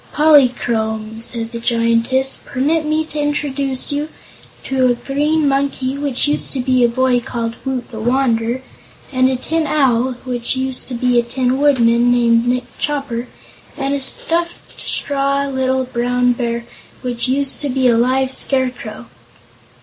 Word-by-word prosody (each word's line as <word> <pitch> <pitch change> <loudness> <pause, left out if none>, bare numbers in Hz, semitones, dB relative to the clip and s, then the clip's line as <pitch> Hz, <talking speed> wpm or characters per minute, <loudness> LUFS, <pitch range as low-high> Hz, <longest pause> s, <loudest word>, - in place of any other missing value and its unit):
"Polychrome," 235 -7 +2
said 230 -1 -3
the 235 - -5
Giantess, 230 +3 +1
"permit 305 +4 0
me 310 +1 +1
to 305 -1 -5
introduce 280 -3 -1
to 290 +2 -1 0.6
you 265 -1 +1
a 245 - +2
Green 295 +4 0
Monkey, 275 -1 0
which 280 -2 -1
used 295 - +1
to 270 - -2
be 255 0 +2
a 240 - +4
boy 255 +1 +2
called 230 -1 -4
Woot 265 -2 -3
the 220 - -7
Wanderer, 240 0 0 0.5
and 255 -1 +3
a 260 - 0
Tin 315 +5 -1
Owl, 260 -4 +2
which 245 -1 -3
used 260 0 -2
to 255 - -4
be 245 0 +2
a - - +1
Tin 255 +2 -1
Woodman 245 -4 +3
named 235 -1 +3
Nick 250 0 +1 0.2
Chopper, 275 -5 -2 0.5
and 275 -1 -1
a 280 - 0
straw 330 +5 +3 0.3
stuffed 275 0 -1
little 260 0 +1
Brown 245 0 +1
Bear 235 -1 -3 0.4
which 245 -1 -2
used 270 +1 0
to 290 - 0
be 260 0 +2
a 235 - +4
live 260 +3 +2
Scarecrow." 250 - -2
260 Hz, 155 wpm, -18 LUFS, 240-275 Hz, 0.6 s, a